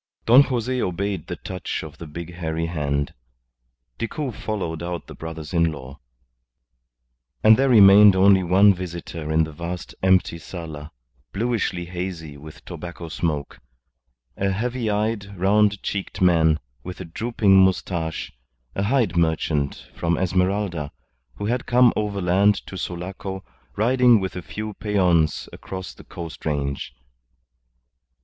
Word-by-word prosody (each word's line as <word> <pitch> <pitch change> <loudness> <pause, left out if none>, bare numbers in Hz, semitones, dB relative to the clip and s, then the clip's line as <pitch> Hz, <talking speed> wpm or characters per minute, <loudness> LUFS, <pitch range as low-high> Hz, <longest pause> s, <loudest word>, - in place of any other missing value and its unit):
Don 125 +4 +8
Jose 125 -2 -1
obeyed 95 +2 -2
the 90 - -4
touch 90 +1 -5
of 80 -1 -11
the 85 - -8
big 85 +3 -8
hairy 80 -1 -3
hand. 70 -4 -2 0.9
Decoud 125 +3 -3
followed 85 -7 -4
out 85 0 -4
the - - -10
brothers 80 -1 -8
in 85 -1 +3
law. 70 -1 -10 1.4
And 110 +1 +8
there 135 +3 +2
remained 100 -3 +8
only 95 0 +5
one 95 +3 +5
visitor 85 -3 -6
in 80 +1 +3
the 80 - -5
vast 85 +3 -6
empty 95 -2 +2
sala, 80 -3 -8 0.4
bluishly 105 -5 -1
hazy 85 -4 -6
with 75 +2 -13
tobacco 85 -1 -8
smoke, 75 -2 -3 0.8
a 100 - 0
heavy 115 +4 -2
eyed, 105 -1 -2
round 100 +1 +3
cheeked 100 0 -4
man, 80 -4 +4 0.2
with 90 0 -8
a 95 - -6
drooping 100 +2 +2
moustache, 85 -3 -1 0.4
a - - -2
hide 115 -1 +1
merchant 80 -4 0
from 85 -1 -1
Esmeralda, 90 -3 0 0.4
who 100 - -5
had 120 +3 -1
come 125 -1 +5
overland 100 -1 +2
to - - -9
Sulaco, 95 +2 -5 0.3
riding 120 +1 +4
with 95 -2 -4
a 90 - -4
few 105 +7 -6
peons 90 -7 +1
across 95 -1 -7
the - - -15
coast 85 -2 -9
range. 70 -4 -3
90 Hz, 135 wpm, -23 LUFS, 80-105 Hz, 1.4 s, Don